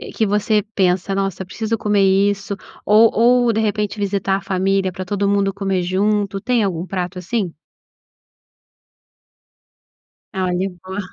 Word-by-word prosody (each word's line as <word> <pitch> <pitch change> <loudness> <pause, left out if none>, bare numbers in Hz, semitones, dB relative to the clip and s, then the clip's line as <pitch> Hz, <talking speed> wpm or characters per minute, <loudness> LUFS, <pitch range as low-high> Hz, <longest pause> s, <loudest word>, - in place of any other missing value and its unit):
que 220 - +2
você 210 +1 +1
pensa: 185 0 +1
"Nossa, 195 -1 -2
eu - - -13
preciso 220 +4 -3
comer 205 -1 +1 0.3
isso." 200 0 -5 0.3
Ou 220 +2 +5
ou, 240 0 +4
de 220 - +1
repente, 210 0 -1
visitar 195 -1 0
a - - -7
família 190 0 0
pra 185 +1 -6
todo 200 +1 0
mundo 200 -1 +1
comer 195 -2 -1
junto. 200 +1 0
Tem 240 -1 +1
algum 175 -4 -2
prato 180 -1 -4
assim? 190 -2 -2 2.8
Olha, 185 0 -1
boa. 190 +2 -5
195 Hz, 140 wpm, -19 LUFS, 190-210 Hz, 2.8 s, Ou